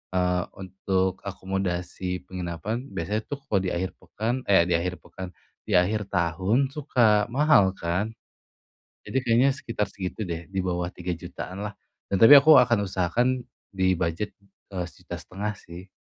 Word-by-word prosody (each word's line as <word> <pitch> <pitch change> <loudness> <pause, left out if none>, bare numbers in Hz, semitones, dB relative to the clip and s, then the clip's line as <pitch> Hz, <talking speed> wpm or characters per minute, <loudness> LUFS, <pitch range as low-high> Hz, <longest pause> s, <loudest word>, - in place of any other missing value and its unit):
eee, 90 -1 +2 0.2
untuk 95 0 -1
akomodasi 90 -2 -3
penginapan, 90 +6 -4
biasanya 105 +6 -1
tuh 145 -2 -5
kalau 100 - +2
di 90 - -1
akhir 95 +2 -2
pekan 120 +4 -3
eh 95 -4 +6
di 90 - +2
akhir 90 +1 -2
pekan, 95 - -8 0.4
di - - -5
akhir 105 +5 +2
tahun 95 +9 +1
suka 120 -8 +2
mahal 135 -9 +5
kan. 90 +6 -1 0.9
Jadi 130 - -3
kayaknya 120 +4 +4
sekitar 115 -6 -3
segitu 95 +2 -5
deh, 85 0 -4
di 95 0 -3
bawah 90 -1 -1
Rp3.000.000-lah, 90 +3 -5 0.3
dan 100 - -1
tapi 140 +6 +11
aku 155 +3 +7
akan 115 -4 +2
usahakan 95 +6 +1 0.5
di 95 -1 +3
budget, 85 +5 -1 0.4
eee, 90 -2 -3
Rp1.500.000 100 +4 -6
sih. 90 +3 -11
95 Hz, 140 wpm, -26 LUFS, 90-110 Hz, 0.9 s, tapi